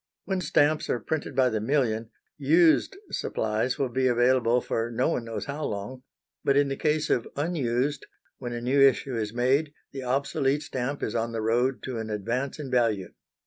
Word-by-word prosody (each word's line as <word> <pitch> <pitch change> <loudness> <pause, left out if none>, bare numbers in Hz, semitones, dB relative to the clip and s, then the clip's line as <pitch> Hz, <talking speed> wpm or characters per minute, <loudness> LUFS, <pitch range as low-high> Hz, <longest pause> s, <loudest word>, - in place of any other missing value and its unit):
When 190 -1 -1
stamps 150 -1 +2
are 120 - +1
printed 145 +3 -3
by 130 -1 +4
the 110 -2 -2
million, 115 -3 0 0.3
used 160 - +3
supplies 110 +3 -1
will 135 - 0
be 130 +2 +1
available 120 0 +3
for 115 -1 -2
no 120 +5 0
one 125 -8 -2
knows 115 -1 -5
how 145 +2 -4
long; 105 +6 -5 0.4
but 140 0 +3
in 145 -1 +3
the 135 - -2
case 150 +1 0
of 120 - +1
unused, 140 -3 -1 0.3
when 120 -2 -5
a 120 0 -4
new 130 +3 +2
issue 135 -1 +4
is 110 -2 -2
made, 135 +6 +1 0.2
the 135 - -6
obsolete 135 +2 0
stamp 135 +1 -3
is 110 - -2
on 115 0 -1
the 115 - -2
road 120 +4 +1
to 125 -3 -4
an 110 0 -5
advance 115 +8 -2
in 145 -4 -6
value. 115 -7 +1
130 Hz, 185 wpm, -27 LUFS, 115-140 Hz, 0.4 s, by